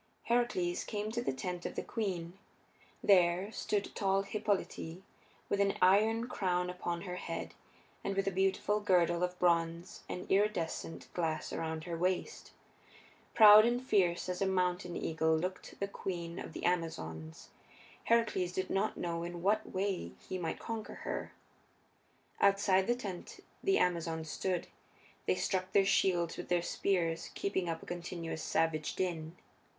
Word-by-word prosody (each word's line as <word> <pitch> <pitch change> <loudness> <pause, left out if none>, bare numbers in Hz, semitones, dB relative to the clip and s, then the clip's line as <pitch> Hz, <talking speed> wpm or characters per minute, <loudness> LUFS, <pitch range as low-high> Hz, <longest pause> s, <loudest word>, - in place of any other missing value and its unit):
Heracles 235 -8 +1
came 210 0 -3
to 235 +1 -1
the 240 - 0
tent 175 +7 -4
of - - -5
the - - -2
queen. 185 -5 -3 0.6
There 185 0 +4
stood 205 -2 -2
tall 195 -1 +1
Hippolyte 195 -4 -2 0.4
with 200 - 0
an 200 0 +2
iron 220 +5 +4
crown 180 -6 0
upon 175 -1 -3
her 180 -2 -5
head 165 -2 -5 0.5
and 195 - -2
with 195 - +1
a - - +2
beautiful 195 +2 +1
girdle 175 -4 +3
of 180 0 -1
bronze 170 0 +1
and 180 - -4
iridescent 190 -5 0
glass 160 -3 -2
around 160 -1 -3
her 170 -1 -4
waist. 180 +2 -2 0.8
Proud 215 -1 +10
and 240 +2 +2
fierce 190 -10 +2
as 180 0 -3
a 195 - +3
mountain 180 -1 0
eagle 160 0 +1
looked 180 +3 -5
the 200 - -1
queen 175 -3 -5
of - - -7
the - - -5
Amazons: 80 - -2 0.6
Heracles 220 -6 +2
did 185 0 -2
not 200 +3 0
know 170 -1 -2
in 175 0 -5
what 215 +3 +1
way 190 0 -2
he 185 - -3
might 165 -2 -2
conquer 225 -2 -5
her. - - -3 1.1
Outside 195 -1 +4
the 240 - +3
tent 200 -8 -7 0.2
the 390 0 +3
Amazons 165 -3 0
stood; 185 -2 -1 0.6
they - - +3
struck 185 -1 -1
their 195 -1 +5
shields 180 -4 +2
with 175 - -7
their 175 -1 +2
spears, 170 -4 0
keeping 190 -3 -1
up 165 -1 -3
a - - -10
continuous 170 -2 -5
savage 155 -2 0
din. 170 -2 -3
180 Hz, 150 wpm, -33 LUFS, 170-200 Hz, 1.1 s, Proud